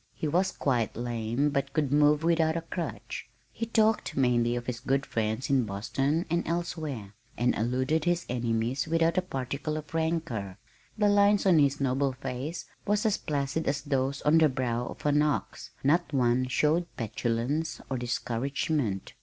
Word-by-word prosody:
He 155 - -2
was 180 +5 +2
quite 125 -9 0
lame 120 +4 -1
but 140 0 -1
could 145 -4 0
move 150 +1 +4
without 165 -1 +2
a - - -2
crutch. 165 +1 -5 0.2
He 230 - -4
talked 220 - +2
mainly 120 -2 +2
of 120 0 -4
his 120 -1 -3
good 135 +1 0
friends 110 +2 -1
in 135 -2 +3
Boston 135 - -1
and 170 +1 +1
elsewhere, 155 - -3 0.2
and 120 +1 +2
alluded 130 +7 0
to 175 - +1
his 175 0 0
enemies 120 +2 -1
without 165 +2 +2
a - - 0
particle 145 -1 -3
of 155 0 -8
rancor. 160 - -2 0.4
The 210 -1 +3
lines 205 0 +4
on 180 -5 +6
his 140 -1 +3
noble 135 0 +1
face 135 +4 -5 0.2
were 205 - +1
as 210 0 +2
placid 145 +1 -2
as 140 0 0
those 135 -1 -1
on 155 +2 +5
the 155 -1 +5
brow 125 -2 -1
of - - -9
an 145 0 +4
ox 150 -1 -1
not 160 +3 +2
one 130 -2 +2
showed 155 +7 +2
petulance 120 +7 -1
or 130 -2 -2
discouragement. 120 - -2
140 Hz, 170 wpm, -28 LUFS, 125-160 Hz, 0.4 s, on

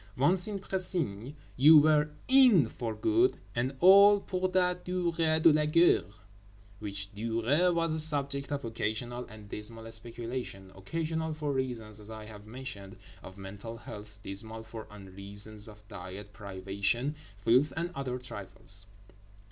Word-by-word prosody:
Once 175 +8 +3
in 210 -2 -3
Précigne 165 - -1 0.2
you 155 +5 +8
were 150 0 +4 0.2
"in" 250 - +6
for 115 -1 -5
good 345 +3 +2 0.2
and 125 +3 -2
all, 200 +3 +8
pour 185 -1 -2
la 180 -1 +3
durée 170 -3 0
de 160 0 +6
la 150 0 +2
guerre, 150 - +3 0.7
which 100 -1 -5
durée 115 - +1
was 165 -1 0
a 160 - 0
subject 140 -2 +2
of 140 -3 -3
occasional 120 +2 -3
and 110 -2 -12
dismal 115 +2 -7
speculation—occasional 120 - -3
for 150 -2 -2
reasons, 115 -5 -3
as 105 0 -11
I 110 -1 -8
have 105 -1 -12
mentioned, 110 -5 -8 0.2
of 95 - -12
mental 100 +4 -8
health; 105 -2 -2
dismal 110 +3 -4
for 110 0 -9
unreasons 100 +2 -3
of 105 -1 -16
diet, 95 +3 -9
privation, 100 +6 -2 0.2
filth, 125 +8 +3
and 170 +1 -2
other 135 -4 -4
trifles. 100 -4 -7
120 Hz, 140 wpm, -30 LUFS, 105-160 Hz, 0.7 s, you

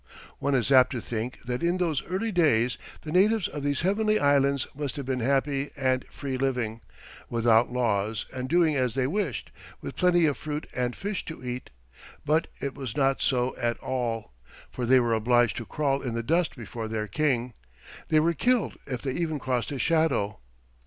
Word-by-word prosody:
One 140 -1 +1
is 125 +1 +1
apt 130 -2 +7
to 125 - -2
think 115 +2 -5
that 125 0 -3
in 170 +2 +1
those 165 -6 0
early 195 +5 -1
days 125 - +2 0.2
the 155 - -7
natives 200 +3 +3
of 145 - -6
these 145 -1 0
heavenly 215 +3 +2
islands 140 -1 +3
must 145 0 -4
have 140 -3 -5
been 130 -1 -1
happy 140 +3 +1
and 130 -2 +1
free 135 -3 -5
living, 125 -4 -1 0.5
without 115 0 +3
laws 110 -3 0
and 130 0 -4
doing 165 -3 +3
as 125 -3 0
they 135 -1 +1
wished, 150 - -2 0.3
with - - -7
plenty 175 -2 +4
of 145 -3 +1
fruit 150 0 -4
and 125 -1 -1
fish 200 -1 -3
to 160 -6 -8
eat; 125 +1 -5 0.6
but 155 +2 +2
it 140 -1 -3
was 135 -4 -6
not 135 -1 +2
so 125 -1 +1
at 120 0 0
all, 120 - -3 0.4
for 125 -2 -3
they 130 +1 +6
were 120 -2 +1
obliged 120 +1 +3
to 120 - -4
crawl 140 -2 0
in 120 -3 -3
the 115 - -2
dust 165 +6 +1
before 115 -2 -6
their 110 -1 -3
king; 125 -1 0 0.5
they 155 - +4
were 165 +2 +2
killed 245 - +1
if 125 -3 -4
they 135 - -1
even 160 +1 -1
crossed 125 -3 -1
his 135 -4 -2
shadow. 160 - +1
135 Hz, 190 wpm, -27 LUFS, 120-155 Hz, 0.6 s, apt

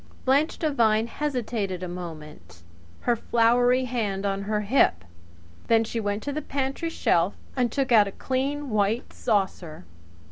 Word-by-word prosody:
Blanche 280 +5 +2
Devine 230 -8 +2
hesitated 230 -9 -3
a - - -3
moment, 150 - -9 0.4
her 240 - +2
floury 245 +3 +3
hand 210 -6 -2
on 195 0 -1
her 210 0 0
hip. 205 - +2 0.6
Then 225 -1 +4
she 230 +1 -4
went 205 -1 -2
to 285 - -3
the 305 - -3
pantry 275 +3 -2
shelf 180 - +1 0.2
and 245 -3 +1
took 270 0 -1
out 215 -3 +6
a - - -5
clean 270 +4 -2
white 215 +3 0
saucer. 190 -7 -2
225 Hz, 145 wpm, -25 LUFS, 195-260 Hz, 0.6 s, out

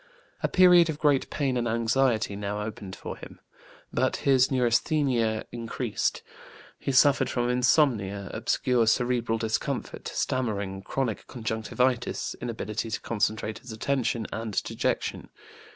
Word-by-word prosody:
A - - +2
period 180 -2 +6
of 155 - -2
great 145 -3 +2
pain 135 -4 -1
and 120 -1 0
anxiety 115 -1 +1
now 105 +1 -3
opened 105 -3 -7
for - - -7
him. - - -12 0.5
But - - +1
his 130 -2 +5
neurasthenia 120 -2 +1
increased; 115 -1 -2 0.6
he - - -2
suffered 135 -1 +4
from 120 -1 0
insomnia, 115 -7 +2
obscure 125 -3 +1
cerebral 120 -1 +1
discomfort, 110 -1 -3
stammering, 100 -7 -2
chronic 115 +1 -3
conjunctivitis, 120 +2 -1
inability 115 -2 -3
to - - -3
concentrate 110 -1 -1
his 125 - -11
attention, 115 0 -1
and 110 -2 -2
dejection. - - -2
120 Hz, 120 wpm, -27 LUFS, 110-130 Hz, 0.6 s, period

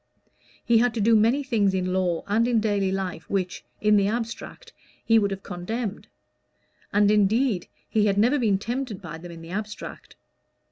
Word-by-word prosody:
He 235 -1 +4
had 245 0 +2
to - - -1
do 225 +2 +4
many 230 +7 +3
things 210 -7 +1
in 185 -1 -1
law 180 -3 0
and 220 +4 +2
in 240 -2 +3
daily 205 -3 0
life 190 -2 -4
which, 185 -2 -2 0.2
in 210 0 +4
the 200 -1 +3
abstract, 235 - -5 0.3
he 225 0 +5
would 200 -2 +1
have 195 -1 -5
condemned; 205 +4 -5 0.8
and 205 0 +4
indeed 210 0 +2 0.2
he 210 -1 +2
had 200 -1 +1
never 245 +8 +3
been 210 -5 +2
tempted 235 0 -4
by 165 -3 -8
them 175 +1 -9
in 165 -1 -10
the 165 - -10
abstract. 210 +2 -6
210 Hz, 180 wpm, -25 LUFS, 190-230 Hz, 0.8 s, he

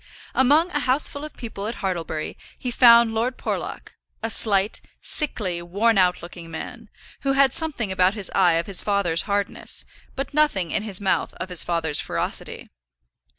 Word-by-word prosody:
Among 295 +7 +4
a 295 - 0
houseful 280 +2 +1
of 305 - -9
people 215 -4 -6
at 230 - -4
Hartlebury, 165 -5 -3 0.2
he 250 - -4
found 235 -1 +6
Lord 240 +3 -1
Porlock, - - -5 0.3
a 225 - -1
slight, 205 -2 +3 0.2
sickly, 200 - -3
worn 200 +5 +1
out 180 -2 +2
looking 170 -1 -9
man, 220 +7 -8 0.3
who 275 -1 0
had 275 -2 +4
something 270 -11 -1
about 185 +1 +2
his 200 -4 -3
eye 180 -3 +4
of 165 +1 0
his 195 -2 +1
father's 200 -5 +1
hardness, 200 0 -2 0.3
but 275 +2 -4
nothing 250 - +2
in - - 0
his 210 -4 -3
mouth 195 -2 0
of 185 - -6
his 180 -2 +3
father's 160 -4 -1
ferocity. - - -4
205 Hz, 165 wpm, -23 LUFS, 180-250 Hz, 0.3 s, found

